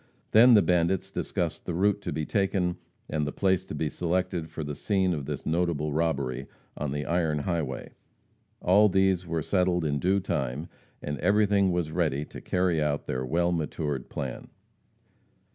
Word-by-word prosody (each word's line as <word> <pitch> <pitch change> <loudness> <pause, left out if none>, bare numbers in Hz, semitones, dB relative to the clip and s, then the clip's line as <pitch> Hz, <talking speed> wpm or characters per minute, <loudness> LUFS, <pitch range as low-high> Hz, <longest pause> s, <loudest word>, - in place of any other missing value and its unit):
Then 120 +2 +8
the 105 - +6
bandits 90 +1 +1
discussed - - -3
the 85 - -2
route 100 +3 +2
to - - -4
be 75 +1 -2
taken, 95 -3 0 0.3
and 75 -1 -1
the - - -2
place 95 0 +1
to - - -5
be 80 - -1
selected 90 0 -1
for 80 0 -5
the 75 0 -4
scene 95 -1 +1
of 75 -4 -4
this - - -4
notable 80 -3 0
robbery, 70 -5 -1 0.3
on 75 -2 -3
the 75 0 -3
iron 80 -1 +1
highway. 75 -4 -3 0.7
All 105 +4 +5
these 95 -2 +2
were 80 -2 -1
settled 90 -2 +1
in 70 -1 0
due 95 +5 +2
time, 75 -4 -3 0.3
and 75 -2 -3
everything 100 +2 +3
was 85 -3 -1
ready 75 -4 0
to - - -10
carry 90 -3 +1
out 75 -1 -1
their 65 0 -2
well 85 +6 +1
matured 75 -5 -2
plan. 65 -3 -5
85 Hz, 170 wpm, -27 LUFS, 75-95 Hz, 0.7 s, Then